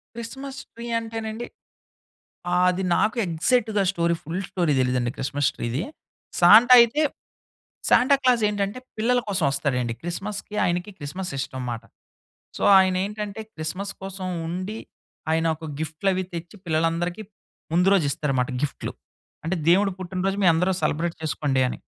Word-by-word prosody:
Christmas 265 +4 -7
tree 235 +1 -8
అంటేనండి. 225 0 -5 1.1
ఆహ్, 180 +1 +3
అది 185 +1 -3
నాకు 220 +3 +1
ఎగ్జాక్ట్‌గా 205 +5 +1
స్టోరీ, 170 -2 +1
ఫుల్ 170 +4 -3
స్టోరీ 170 -5 +1
తెలీదండి 125 -1 +1
క్రిస్మస్ 140 +1 0
ట్రీది. 120 +5 -2 0.6
సాంటా 220 +8 +8
అయితే 235 +6 +2 0.9
సాంటాక్లాస్ 255 -2 +4
ఏంటంటే, 205 +3 -2 0.2
పిల్లల 245 +3 +2
కోసం 190 -5 0
వస్తాడండి. 125 -4 -1
క్రిస్మస్‌కి 200 +5 -5
ఆయనకి, 175 +3 -1
క్రిస్మస్ 180 +6 -5
ఇష్టం 130 -1 -4
మాట. 115 -1 -5 0.7
సో, - - -4 0.2
ఆయన 190 -1 +3
ఏంటంటే 210 0 -5
క్రిస్మస్ 185 +6 -4
కోసం 190 -1 -5 0.2
ఉండి, 185 +6 -4 0.5
ఆయన 160 +1 +1
ఒక 160 0 -8
గిఫ్ట్‌లు 160 +5 -1
అవి 185 0 -1
తెచ్చి, 170 +3 -7
పిల్లలందరికీ 165 +4 0 0.5
ముందు 180 +3 +4
రోజిస్తారనమాట 140 -6 0
గిఫ్ట్‌‍లు. 145 - -3 0.5
అంటే, 175 +3 -1
దేవుడు 195 +2 +4
పుట్టినరోజు 190 +2 -2
మీ - - +7
అందరూ 180 +4 +2
సెలబ్రేట్ 165 +3 0
చేసుకోండి 145 -4 0
అని. - - -7
180 Hz, 130 wpm, -24 LUFS, 160-210 Hz, 1.1 s, సాంటా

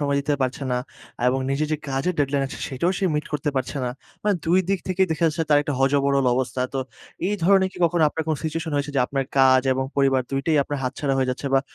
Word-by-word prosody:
সময় 140 -1 +1
দিতে 145 +1 0
পারছে 130 +2 -2
না 125 - +1 0.5
এবং 130 +1 +1
নিজের 145 +3 0
যে 155 - +2
কাজের 135 +7 -1
ডেডলাইন 140 -1 +1
আছে - - -8
সেটাও 140 +7 0
সে - - -1
মিট 150 - -1
করতে 150 0 -1
পারছে 130 +2 -2
না। 125 - -1 0.3
মানে 210 -1 +2
২ 175 +3 +3
দিক 195 -1 +2
থেকেই 185 +1 +2
দেখা 160 +1 0
যাচ্ছে 160 +1 0
তার 145 - +6
একটা 145 - -3
হযবরল 140 0 +2
অবস্থা। 130 0 -2
তো 135 - 0 0.5
এই 210 - 0
ধরনের 190 +1 +4
কি - - -12
কখনো 170 0 +2
আপনার 160 +2 -3
কোন 155 - +1
সিচুয়েশন 160 0 -3
হয়েছে 145 +1 -1
যে - - +4
আপনার 135 -1 -1
কাজ 130 -1 +6
এবং 130 0 -1
পরিবার 135 -1 +3
দুই 135 0 0
টাই 160 -2 +3
আপনার 145 0 -4
হাতছাড়া 135 +2 -1
হয়ে 130 -1 +1
যাচ্ছে 130 +2 -4
বা 135 - +5
140 Hz, 240 wpm, -23 LUFS, 135-160 Hz, 0.5 s, তার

